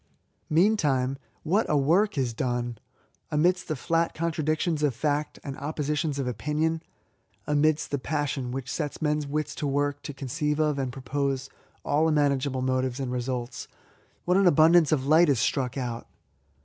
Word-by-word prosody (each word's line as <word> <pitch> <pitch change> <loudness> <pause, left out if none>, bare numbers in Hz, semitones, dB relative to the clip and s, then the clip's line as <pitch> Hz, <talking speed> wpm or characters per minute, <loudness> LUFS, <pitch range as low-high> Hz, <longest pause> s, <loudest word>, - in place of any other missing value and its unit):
Meantime, 150 -8 +2 0.3
what 195 +8 +2
a 150 - +3
work 170 +7 +2
is 125 -3 0
done! 120 0 -2 0.5
Amidst 175 +4 +2
the 155 - -1
flat 165 +4 0
contradictions 155 0 -1
of 145 -5 +1
fact, 150 +3 -1
and 140 -2 -5
oppositions 150 0 -2
of 135 - -1
opinion, 150 +7 -1 0.3
— - - -42 0.3
amidst 150 +1 +1
the 140 - 0
passion 140 -3 -2
v^hich 130 0 -4
sets 145 +2 -3
men's 150 -1 0
wits 150 +2 -2
to 145 - -3
work 145 +1 0
to - - -6
conceive 150 +3 -2
of 150 -2 +1
and 130 -2 -2
propose 135 +1 -2 0.3
all 150 +3 +2
imaginable 140 -3 +1
motives 130 0 0
and 130 -2 -3
resxdts, 125 -1 -3 0.6
what 180 +1 +3
an 195 -1 +5
abundance 165 0 +5
of 135 -4 +1
light 160 +3 +5
is 135 -5 +3
struck 130 +2 0
out 120 -3 -4
145 Hz, 160 wpm, -27 LUFS, 130-155 Hz, 0.6 s, an